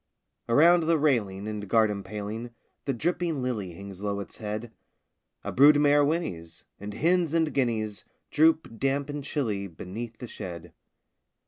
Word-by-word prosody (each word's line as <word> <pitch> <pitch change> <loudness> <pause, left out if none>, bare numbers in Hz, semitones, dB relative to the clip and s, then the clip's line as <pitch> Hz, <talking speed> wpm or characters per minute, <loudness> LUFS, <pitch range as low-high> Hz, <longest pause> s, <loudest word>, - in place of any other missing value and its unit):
Around 165 +7 +6
the 165 -1 +4
railing 105 -10 +1
and 105 -1 -4
garden 105 -2 +3
paling 105 +4 -5 0.4
The 135 - 0
dripping 165 +1 -1
lily 105 -8 -3
hangs 100 +1 -9
low 100 -1 -2
its 100 - -8
head: 110 +2 -4 0.7
A - - -3
brood 145 +3 +7
mare 145 0 +5
whinnies; 90 - -2
and 100 +1 -7
hens 170 -1 +2
and 160 -2 +2
guineas 110 -5 -1 0.3
Droop, 155 -6 +3
damp 140 +1 0
and 145 -1 -5
chilly, 110 -10 -2
beneath 110 +7 -7
the 125 - -7
shed. 90 -7 -8
115 Hz, 145 wpm, -27 LUFS, 100-145 Hz, 0.7 s, brood